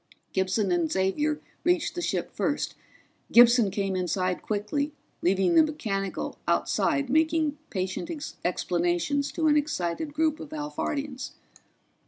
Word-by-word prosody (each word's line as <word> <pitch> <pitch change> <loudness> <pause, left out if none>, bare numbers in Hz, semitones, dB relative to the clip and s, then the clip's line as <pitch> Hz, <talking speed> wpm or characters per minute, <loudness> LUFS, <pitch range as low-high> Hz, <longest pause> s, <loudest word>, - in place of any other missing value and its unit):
Gibson 190 +1 +1
and 170 -3 +1
Xavier 295 +12 +1 0.2
reached 350 -1 +2
the 350 - -4
ship - - -2
first; - - -1 0.6
Gibson 235 -2 +7
came 195 0 -1
inside 185 0 -1
quickly, 220 +8 -2 0.3
leaving 190 - +3
the 330 - +8
mechanical 210 -11 -2
outside 280 -1 +1
making 315 +1 +2
patient 190 - -3 0.3
explanations 175 +10 0
to 325 - -1
an 300 -1 +5
excited 290 - -1
group 310 0 +1
of - - -8
Alphardians. 295 -2 -4
240 Hz, 120 wpm, -27 LUFS, 190-300 Hz, 0.6 s, the